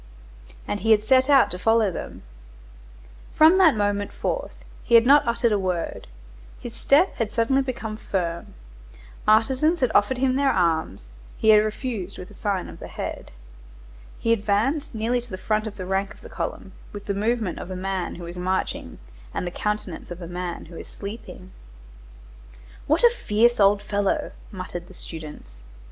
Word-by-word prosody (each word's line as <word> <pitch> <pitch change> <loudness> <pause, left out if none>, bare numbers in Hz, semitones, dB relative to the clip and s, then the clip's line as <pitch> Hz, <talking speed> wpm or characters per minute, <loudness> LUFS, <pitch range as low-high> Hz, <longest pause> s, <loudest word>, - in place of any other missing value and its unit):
And 205 - -2
he 225 - -2
had 215 -1 +5
set 260 +3 +4
out 275 -2 +5
to 180 - -4
follow 225 0 +3
them. - - -7 1.1
From 320 +5 +6
that 325 -9 +6
moment 205 -1 -1
forth - - -3 0.3
he 235 - +3
had 230 0 +7
not 280 0 +6
uttered 235 0 +1
a 205 - +2
word. 180 -3 -3 0.5
His 240 - -8
step 300 +10 +3
had 225 -3 -1
suddenly 240 +4 +2
become 230 -5 -4
firm; 170 -6 -3 0.7
artisans 265 +10 +3
had 255 -5 +1
offered 225 +6 +3
him 260 0 +1
their 280 -1 +3
arms; 160 - 0 0.3
he 220 - +2
had 210 -1 +7
refused 215 -3 -4
with 180 - -9
a - - -13
sign 200 -4 -2
of - - -11
the - - -8
head. - - -6 0.9
He 230 - +2
advanced 230 +8 0
nearly 235 +3 0
to 240 - -14
the 185 - -5
front 215 +3 -1
rank 190 +1 -2
of - - -20
the - - -11
column, - - -5 0.2
with 205 -1 -9
the 200 - -1
movement 215 -2 -1
of - - -7
a 185 - -5
man 190 0 -3
who 175 - -8
is 175 +1 -8
marching 185 +1 -2 0.4
and - - -2
the 175 - -3
countenance 210 -3 -4
of 175 0 -7
a 170 - -7
man 175 0 -5
who 165 0 -11
is - - -9
sleeping. 200 -3 -9 1.4
"What 310 +8 +2
a 475 - +8
fierce 235 - +2
old 200 0 +4
fellow!" 205 -1 -1 0.2
muttered 185 -3 -7
the 190 - -15
students. 150 - -10
210 Hz, 175 wpm, -24 LUFS, 185-240 Hz, 1.4 s, a